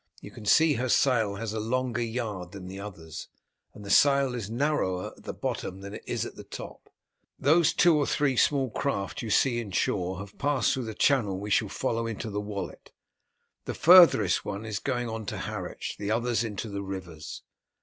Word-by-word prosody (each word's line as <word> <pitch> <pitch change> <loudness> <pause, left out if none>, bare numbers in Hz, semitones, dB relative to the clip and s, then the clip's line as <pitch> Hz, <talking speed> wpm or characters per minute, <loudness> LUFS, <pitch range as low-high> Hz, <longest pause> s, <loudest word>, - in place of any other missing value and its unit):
You - - -11
can 105 - -10
see 160 +7 +5
her 125 0 -2
sail 115 -7 +3
has 110 +1 -4
a 110 - -2
longer 120 +2 -1
yard 110 -7 -4
than 95 -2 -8
the 95 +1 -7
others, 85 -6 -8 0.5
and 105 - -11
the 100 - -4
sail 140 +2 +5
is 115 -4 -4
narrower 115 -8 -1
at - - -19
the - - -3
bottom 95 +1 -4
than 100 +1 -8
it - - -8
is - - -1
at - - -7
the - - -9
top. - - -10 0.5
Those 160 +2 +4
two 170 -3 +4
or 145 - +1
three 140 -3 +1
small 135 0 +2
craft 100 -6 -2
you 115 - -5
see 120 +3 +3
more - - 0
inshore 95 -3 -1
have 100 +2 -10
passed 140 -5 +2
through 130 -2 -3
the 110 -1 -6
channel 110 -8 +2
we 105 +1 -5
shall 105 0 +2
follow 115 +1 -2
into 115 0 -5
the 105 +1 -2
Wallet. 105 -1 -6 0.7
The - - -4
farthest 170 - +7
one 100 +1 -5
is 105 -3 -3
going 125 -1 -2
on 110 -2 -5
to - - -3
Harwich, - - -5
the 100 - -3
others 120 +1 +1
into 110 0 -4
the 100 -1 -4
rivers. 90 -5 -7
110 Hz, 200 wpm, -28 LUFS, 100-130 Hz, 0.7 s, farthest